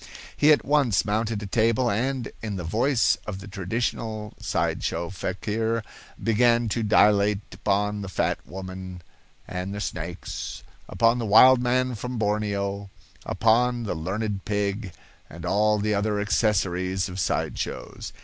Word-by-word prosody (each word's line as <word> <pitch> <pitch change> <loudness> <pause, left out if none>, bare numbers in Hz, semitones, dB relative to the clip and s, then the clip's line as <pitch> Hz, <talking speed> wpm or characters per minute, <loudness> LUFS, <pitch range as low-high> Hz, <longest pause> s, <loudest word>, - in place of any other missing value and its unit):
He 150 +1 +5
at 150 - +3
once 135 -10 +2
mounted 105 0 -1
a - - -4
table, 115 +4 +2
and, 125 +3 -1
in 105 -2 -4
the 90 - -4
voice 120 - +2
of 105 -3 -4
the 100 - -10
traditional 110 +2 -3
side - - -1
show 85 +1 -2
fakir, 110 +5 -2 0.4
began 115 +1 +3
to 115 +3 -1
dilate 105 -1 +4
upon 105 0 0
the 100 - -5
fat - - 0
woman 95 0 -8 0.4
and 90 +2 -4
the - - -4
snakes, - - -5 0.3
upon 115 +1 +3
the 115 - -2
wild 125 +5 +7
man 125 +1 +1
from 125 +2 -5
Borneo, 100 -2 -1 0.4
upon 120 +4 +2
the 110 - -2
learned 95 +5 -3
pig, 100 -1 -2 0.4
and - - -9
all 105 +1 +3
the 105 +1 0
other 105 +1 0
accessories 95 -3 +1
of 90 +1 -6
side - - -1
shows. - - -5
105 Hz, 145 wpm, -25 LUFS, 100-115 Hz, 0.4 s, wild